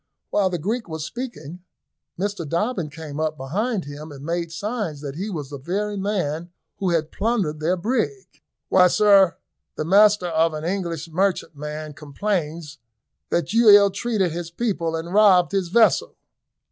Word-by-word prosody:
While 195 -2 +2
the 180 - -2
Greek 215 +6 -3
was 160 -1 -4
speaking, 180 - -7 0.6
Mr 200 -2 -2
Dobbin 180 - -1
came 150 -1 -8
up 155 -1 -1
behind 190 - -2
him, 145 +2 -9
and 140 0 -10
made 170 0 -2
signs 200 -4 -3
that 140 -2 -5
he 190 +8 -4
was 150 -7 -5
the 140 - -6
very 205 +8 -2
man 180 -5 -2 0.3
who 190 - -1
had 165 -2 0
plundered 200 -9 -1
their 170 +4 0
brig. 255 - -3 0.3
"Why, 185 -1 +5
sir, 195 -1 +5 0.4
the 155 - -3
master 205 +2 +5
of 165 -1 +1
an 155 - -5
English 170 -3 -3
merchantman 155 -4 -2
complains 155 0 -3 0.5
that 170 - -1
you 230 -1 +6
ill 205 -1 +8
treated 200 -3 -1
his 170 +1 -5
people 170 -4 -2
and 165 +2 -5
robbed 195 -4 +5
his 195 -3 0
vessel." 220 +5 +3
175 Hz, 160 wpm, -23 LUFS, 155-205 Hz, 0.6 s, ill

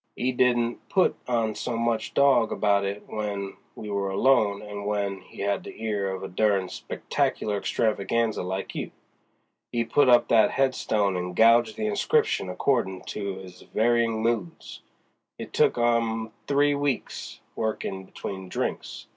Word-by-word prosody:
He 130 - 0
didn't 120 -2 +1
put 190 - +3
on 115 -3 +1
so 115 +2 -3
much 115 -1 -1
dog 135 -5 +4
about 100 -1 +2
it 100 +1 -4
w'en 100 -2 -4 0.2
we 110 - -8
were 100 -1 -1
alone 105 -1 +2
as 105 - -10
w'en 100 -1 -2
he - - -11
had 100 0 0
the - - -10
ear 105 -3 -1
of 95 0 -5
a - - -3
denied 100 -1 +1
Spectacular 105 - -2
Extravaganza 110 +1 0
like 95 +2 -4
you. - - -4 0.8
'E 120 -1 0
put 130 +4 +3
up 120 -1 +6
that 110 -2 +5
headstone 110 -7 +1
and 90 0 -3
gouged 115 +1 +5
the 110 - -2
inscription 100 -2 +1
accordin' 95 -2 0
to 100 -2 -4
his 90 -1 -11
varyin' 115 0 +1
moods. 115 -7 -3 0.6
It - - -8
took - - +3
'im 115 -2 +1 0.2
three 145 +1 +3
weeks, 140 -2 -3 0.2
workin' 105 -3 -3
between 95 0 -7
drinks. - - -4
110 Hz, 150 wpm, -26 LUFS, 100-120 Hz, 0.8 s, up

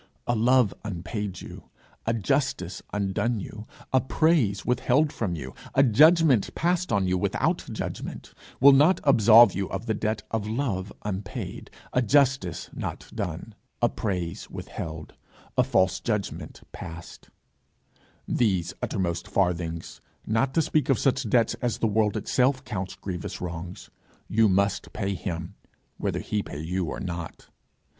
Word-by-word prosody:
A 120 - +1
love 120 -1 +4
unpaid 100 0 -4
you, - - -11 0.4
a 115 - +2
justice 115 -5 -1
undone 105 +3 0
you, 105 +3 -8 0.3
a 130 - +5
praise 125 - +2
withheld 130 +4 +2
from 95 -7 -2
you, 65 -4 -7 0.2
a 135 - +6
judgment 150 - +5
passed 175 +2 0
on 100 -2 +2
you 90 0 +1
without - - 0
judgment, - - -6 0.3
will 140 +2 +9
not 150 +7 +5
absolve 120 -4 +7
you 95 0 -2
of - - -4
the 110 - 0
debt 110 +1 -2
of 110 -2 -1
a - - -3
love 110 -6 -2
unpaid, 100 0 -5 0.2
a 125 - +3
justice 130 - +2
not - - -6
done, - - -4 0.3
a - - +3
praise 90 -6 -3
withheld, 80 -1 -7 0.4
a - - +4
false 95 0 +2
judgment 105 -5 -3
passed: 85 0 -10 1.0
these 95 -8 +1
uttermost 85 -3 -2
farthings 85 -3 -1 0.2
not 115 +5 +1
to 165 - +4
speak 150 -2 0
of 135 - +4
such 135 -3 +1
debts 115 0 +3
as 120 -3 0
the - - 0
world 105 -1 +2
itself 130 +1 +1
counts 95 -5 -4
grievous 95 0 -5
wrongs 90 +1 -7 0.4
you 110 0 +3
must 100 +1 0
pay 100 -2 -2
him, 85 -1 -5 0.4
whether - - -2
he 105 - -1
pay 70 - -8
you 90 +3 -2
or - - -4
not. 85 -3 -6
105 Hz, 145 wpm, -26 LUFS, 95-125 Hz, 1.0 s, will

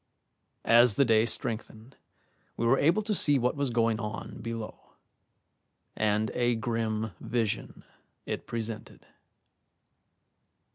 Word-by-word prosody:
As 120 -2 +6
the 140 - +4
day 110 -1 +4
strengthened, 115 +2 -5 0.6
we 115 - -1
were 130 +3 +4
able 170 +9 +3
to 215 0 -1
see 145 -7 +4
what 125 +3 0
was 140 -2 -1
going 115 -2 +1
on 105 0 -6
below, 115 -2 -7 1.0
and 105 0 +1
a 120 -1 +1
grim 110 -1 -2
vision 115 -3 -3 0.4
it - - -5
presented. 115 -1 -6
115 Hz, 110 wpm, -29 LUFS, 110-125 Hz, 1.0 s, As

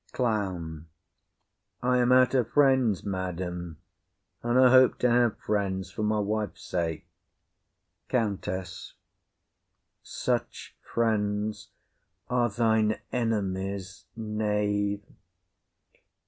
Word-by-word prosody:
CLOWN. 90 - -2 1.0
I 125 0 +3
am 125 0 +3
out 130 0 +5
of 125 -3 +2
friends, 130 -8 +3
madam, 90 -3 -4 0.6
and 120 +1 +1
I 130 -1 +7
hope 130 -1 +6
to 125 - +4
have 120 -2 +3
friends 95 -3 -2
for 105 - -5
my 105 0 +1
wife's 105 -4 -2
sake. 85 -3 -2 1.0
COUNTESS. 95 -6 -3 1.1
Such - - -3
friends 105 -2 -1 0.6
are 120 -1 +2
thine 110 -1 +2
enemies, 100 -4 -2
knave. 105 -2 -1
105 Hz, 90 wpm, -27 LUFS, 95-120 Hz, 1.1 s, I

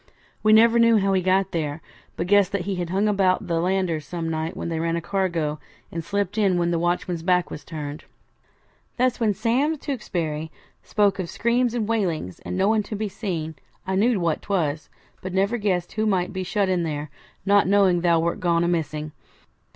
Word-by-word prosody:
We 215 - +4
never 230 +2 +6
knew 230 -1 +5
how 195 -1 +2
he 190 - +2
got 190 +1 +2
there, 155 -2 -2 0.4
but 170 - -2
guessed 200 0 +4
that 200 - 0
he 195 0 -3
had 175 -1 -3
hung 195 +4 +1
about 195 -3 +2
the 165 -1 0
landers 180 -3 0
some 165 +1 -4
night 160 +2 -3
when - - -4
they 165 -1 -2
ran 165 0 0
a - - 0
cargo, 170 -4 -1 0.3
and 165 0 -4
slipped 200 +3 -2
in 195 -4 +3
when 170 0 +1
the 170 - +1
watchman's 175 0 -1
back 180 0 +1
was - - -7
turned. 150 -2 -7 0.9
Thus 255 0 +1
when 215 -4 +1
Sam 270 +10 +1
Tewkesbury 165 - -3 0.3
spoke 205 -2 +1
of 175 -3 -3
screams 240 +1 +1
and 220 -3 -1
wailings, 180 - -1
and - - -5
no 190 +1 +2
one 220 0 +3
to 210 +1 -6
be 210 0 -2
seen, 170 -7 -4 0.3
I 190 - -2
knew 215 +3 +2
what 165 -3 0
'twas, 155 -7 -1 0.3
but 185 0 -5
never 200 +5 +1
guessed 185 -4 -1
who 215 0 -1
might 185 -3 0
be 190 - -3
shut 195 +2 0
in 185 -2 +1
there, 150 -2 -4 0.3
not 200 -1 +4
knowing 190 -3 +4
thou 170 -1 +3
wert 170 +5 -1
gone 170 -2 +2
amissing. 155 -3 -2
185 Hz, 200 wpm, -24 LUFS, 165-205 Hz, 0.9 s, never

